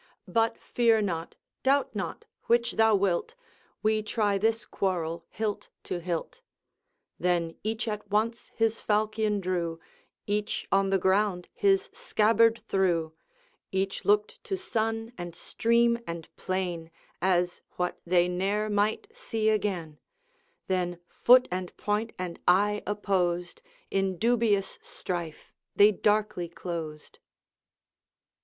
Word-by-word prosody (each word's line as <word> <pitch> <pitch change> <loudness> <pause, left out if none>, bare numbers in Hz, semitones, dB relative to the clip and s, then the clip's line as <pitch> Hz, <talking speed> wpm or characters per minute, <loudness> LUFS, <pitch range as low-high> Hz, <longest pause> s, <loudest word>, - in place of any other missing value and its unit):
But 230 0 +1
fear 230 -2 +2
not 170 -5 -2 0.3
doubt 275 +1 +2
not - - -4 0.2
which 235 0 +3
thou 220 -1 +4
wilt 195 - 0 0.5
We 215 0 +2
try 210 -2 0
this 225 +2 +1
quarrel 170 -3 -2
hilt 215 -2 -3
to 180 - -3
hilt.' 175 - -4 0.8
Then 175 -2 +1
each 220 +2 -2
at 210 -1 -4
once 225 +3 0
his 225 0 +1
falchion 215 0 +1
drew, 175 -3 -2 0.5
Each 210 0 -1
on 195 0 +3
the 195 - +3
ground 190 -1 +1
his 390 -1 +2
scabbard 225 +1 +3
threw 170 -5 +1 0.6
Each 190 0 -1
looked 425 +4 +1
to 385 - -2
sun 225 -9 -2
and 175 -1 -6
stream 235 +4 +2
and 170 -1 -7
plain 180 -3 -3 0.3
As 180 -1 +1
what 180 0 -2
they 175 0 +3
ne'er 200 +4 0
might 210 - +1
see 225 - -1
again; 185 -8 -1 0.7
Then 180 -2 -1
foot 250 +1 +6
and 180 0 -4
point 210 +2 -1
and 180 -2 -5
eye 205 +3 +4
opposed, 180 -4 -1 0.3
In 195 -1 0
dubious 225 -3 +1
strife 170 -4 -6 0.2
they 205 +1 +7
darkly 210 -4 0
closed. 165 -3 -6
205 Hz, 120 wpm, -28 LUFS, 180-225 Hz, 0.8 s, they